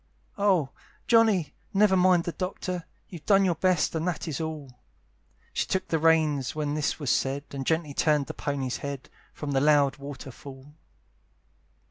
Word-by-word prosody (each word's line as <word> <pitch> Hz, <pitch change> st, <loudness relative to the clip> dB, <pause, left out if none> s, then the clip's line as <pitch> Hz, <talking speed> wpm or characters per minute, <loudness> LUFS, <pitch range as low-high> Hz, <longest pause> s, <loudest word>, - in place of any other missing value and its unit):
"Oh! 185 Hz, -9 st, +2 dB, 0.3 s
Johnny, 215 Hz, -, +3 dB, 0.2 s
never 200 Hz, -1 st, +5 dB
mind 180 Hz, -2 st, +4 dB
the 170 Hz, -, -3 dB
Doctor; 185 Hz, -1 st, -4 dB, 0.2 s
"You've 170 Hz, -4 st, -11 dB
done 195 Hz, -1 st, +5 dB
your 180 Hz, -, +2 dB
best, 180 Hz, 0 st, +1 dB
and 160 Hz, +1 st, -2 dB
that 175 Hz, -1 st, -3 dB
is 155 Hz, -1 st, -3 dB
all." 155 Hz, -4 st, -5 dB, 0.8 s
She -, -, -1 dB
took 190 Hz, -, -2 dB
the 160 Hz, -, +1 dB
reins, 155 Hz, -4 st, +2 dB
when 150 Hz, -1 st, -2 dB
this 150 Hz, +1 st, -1 dB
was 140 Hz, -5 st, 0 dB
said, 135 Hz, +1 st, 0 dB
And 135 Hz, -1 st, -5 dB
gently 160 Hz, -3 st, 0 dB
turned 150 Hz, -1 st, +2 dB
the -, -, -7 dB
pony's 135 Hz, -3 st, -3 dB
head 140 Hz, -2 st, -7 dB, 0.2 s
From 150 Hz, -2 st, -5 dB
the 135 Hz, -1 st, +2 dB
loud 145 Hz, -1 st, +4 dB
water 140 Hz, -1 st, -8 dB
fall. 135 Hz, +3 st, -12 dB
155 Hz, 165 wpm, -27 LUFS, 140-180 Hz, 0.8 s, never